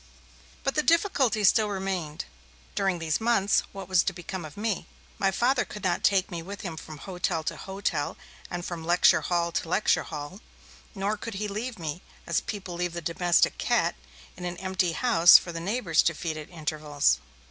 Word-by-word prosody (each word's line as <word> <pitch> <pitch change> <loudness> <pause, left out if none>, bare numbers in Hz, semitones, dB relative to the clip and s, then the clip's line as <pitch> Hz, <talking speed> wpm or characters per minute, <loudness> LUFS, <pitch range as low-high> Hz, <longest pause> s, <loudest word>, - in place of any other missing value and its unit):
But 270 - 0
the 305 - +2
difficulty 295 - +2
still 210 +2 +4
remained. 190 -6 -3 0.5
During 195 -2 +1
these 165 +3 -1
months 220 -3 +3
what 195 -1 -8
was 185 -2 +4
to 195 - -1
become 175 0 -6
of 155 - -11
me? 210 -1 -2 0.3
My 195 - +3
Father 245 +6 +2
could 210 - -9
not 180 -2 0
take 195 0 +3
me 170 -1 -4
with 200 +4 -8
him 180 -6 -5
from 155 -1 -9
hotel 175 0 -2
to - - -2
hotel 190 -6 -3 0.3
and 175 0 -4
from 170 -2 -5
lecture 175 +2 +4
hall 170 -1 0
to 165 - -2
lecture 200 +4 +3
hall. 150 +4 -7 0.6
Nor 200 +2 -1
could 225 0 -6
he 210 +2 -2
leave 220 +4 -4
me, 165 0 -5 0.2
as - - +1
people 195 -4 -6
leave 175 0 -2
the 170 - -4
domestic 175 +2 +2
cat, - - +2 0.4
in 180 - -10
an 175 0 -4
empty 185 -2 0
house 175 -4 +7
for 175 - -5
the 165 - -5
neighbours 185 -2 +2
to 170 - +1
feed 160 0 -3
at 155 +1 -8
intervals. 150 -3 0
180 Hz, 190 wpm, -27 LUFS, 165-205 Hz, 0.6 s, house